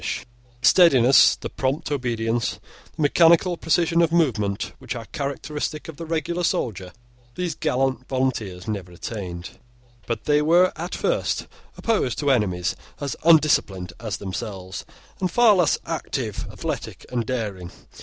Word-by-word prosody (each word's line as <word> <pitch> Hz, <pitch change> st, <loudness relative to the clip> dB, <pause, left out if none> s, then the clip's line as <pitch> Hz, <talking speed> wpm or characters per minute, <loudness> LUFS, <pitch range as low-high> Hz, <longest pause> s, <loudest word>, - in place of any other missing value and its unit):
The -, -, +4 dB
steadiness, 135 Hz, -8 st, +6 dB
the -, -, -6 dB
prompt 135 Hz, +4 st, -2 dB
obedience, 120 Hz, -4 st, -1 dB, 0.4 s
the 160 Hz, -, -2 dB
mechanical 170 Hz, +4 st, +5 dB
precision 170 Hz, +1 st, +2 dB
of 165 Hz, -1 st, +2 dB
movement, 110 Hz, -12 st, 0 dB
which 130 Hz, 0 st, -5 dB
are 115 Hz, -2 st, -6 dB
characteristic 145 Hz, +2 st, -4 dB
of 160 Hz, -3 st, -9 dB
the 165 Hz, -, -7 dB
regular 165 Hz, +2 st, -2 dB
soldier, 95 Hz, -, -1 dB, 0.4 s
these 180 Hz, -3 st, -2 dB
gallant 130 Hz, -3 st, -1 dB
volunteers 115 Hz, -9 st, -2 dB
never 100 Hz, -5 st, -4 dB
attained. 90 Hz, -2 st, -7 dB, 0.5 s
But 115 Hz, -2 st, -3 dB
they 150 Hz, 0 st, +3 dB
were 175 Hz, +4 st, +4 dB
at 175 Hz, +3 st, -5 dB
first -, -, 0 dB, 0.3 s
opposed 215 Hz, -, 0 dB
to 145 Hz, -2 st, +2 dB
enemies 90 Hz, -8 st, +1 dB, 0.2 s
as 140 Hz, -1 st, -3 dB
undisciplined 140 Hz, -, +3 dB
as 110 Hz, -5 st, -4 dB
themselves, 95 Hz, -1 st, -6 dB, 0.3 s
and 185 Hz, -, 0 dB
far 235 Hz, +3 st, +5 dB
less 175 Hz, -5 st, +3 dB
active, 130 Hz, -9 st, -3 dB
athletic, -, -, -5 dB
and 120 Hz, -2 st, 0 dB
daring. 105 Hz, -7 st, -4 dB
130 Hz, 135 wpm, -23 LUFS, 105-165 Hz, 0.5 s, steadiness